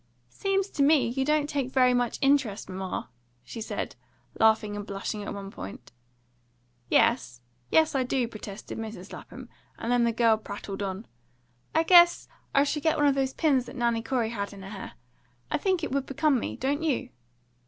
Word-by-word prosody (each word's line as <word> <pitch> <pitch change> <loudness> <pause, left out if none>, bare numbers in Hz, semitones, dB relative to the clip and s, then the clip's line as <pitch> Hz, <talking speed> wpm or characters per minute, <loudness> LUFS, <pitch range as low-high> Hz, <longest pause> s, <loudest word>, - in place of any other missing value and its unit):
"Seems 390 - -1
to 285 - -2
me 280 -3 +4
you 265 +3 -1
don't 300 +1 +2
take 280 -3 -2
very 255 -1 +4
much 245 -1 0
interest, 270 -7 +2
mamma!" 185 -7 -5 0.3
she 225 - -8
said, 220 - -4 0.4
laughing 220 -1 +3
and 205 - -4
blushing 200 +1 -4
at 205 - -5
one 200 -1 -7
point. 95 - -9 1.0
"Yes, 125 - +2 0.3
yes, 320 -1 +4
I 270 - +1
do," 250 -1 0
protested 215 -1 -8
Mrs. 215 -4 -7
Lapham, - - -10 0.3
and 230 - -3
then 245 -1 +3
the 235 - +3
girl 230 -1 +3
prattled 200 -1 -7
on. 195 +2 -4 0.7
"I 320 - +4
guess 345 0 +6 0.2
I 275 - +4
shall 295 +1 -1
get 320 +1 +2
one 295 - +3
of 285 - +5
those 270 -1 0
pins 275 -6 +2
that - - -9
Nanny 235 -2 +1
Corey 235 -2 -1
had 200 -3 -4
in 195 -1 -10
her 195 - -8
hair. 195 -3 -7 0.6
I - - +1
think 370 0 0
it - - -2
would 275 0 -1
become 295 -1 +2
me, - - -4
don't 280 +4 -1
you?" 270 -5 -1
245 Hz, 185 wpm, -27 LUFS, 210-285 Hz, 1.0 s, guess